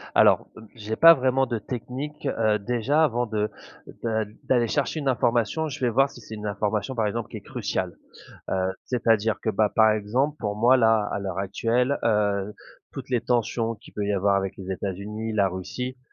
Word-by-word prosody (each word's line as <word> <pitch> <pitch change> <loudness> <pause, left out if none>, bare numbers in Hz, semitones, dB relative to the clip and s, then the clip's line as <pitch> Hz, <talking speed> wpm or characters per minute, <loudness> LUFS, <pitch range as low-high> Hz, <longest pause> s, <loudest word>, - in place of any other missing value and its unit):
Alors, - - +5
heu, 110 - -11
j'ai 110 0 -4
pas 165 0 +9
vraiment 130 -1 +1
de 120 -3 -3
technique, 135 +6 -6
heu, 110 -4 +1
déjà, 125 +8 +1
avant 120 -4 +1
de 105 -1 -1 0.5
de 110 -2 0 0.2
d'aller 120 -3 +2
chercher 145 +5 -1
une 140 - -3
information, 120 +5 +1
je - - -7
vais 125 -2 +1
voir 135 +4 +3
si - - -13
c'est 110 - -9
une 105 0 -5
information, 105 +4 -2
par 110 -2 +1
exemple, 115 +2 -3
qui 110 - -7
est - - -10
cruciale, 100 -7 -3 0.5
heu, - - 0 0.3
c'est-à-dire 115 -3 +1
que, 110 - -1
bah, 105 0 +1
par 110 -1 +6
exemple 120 +8 0
pour 105 -2 -2
moi, 120 +4 +5
là, 110 -3 +3
à - - -2
l'heure 95 -1 -4
actuelle, 120 +7 0
heu, 105 -2 +1 0.4
toutes - - -8
les 120 -2 +1
tensions 115 -1 0
qui - - -17
peut 105 - -3
y 105 - 0
avoir 100 +1 +2
avec 95 0 -1
les 95 0 -6
États-Unis, 105 +4 -4
la 100 -2 +3
Russie, 125 +8 -5
110 Hz, 195 wpm, -25 LUFS, 105-125 Hz, 0.5 s, pas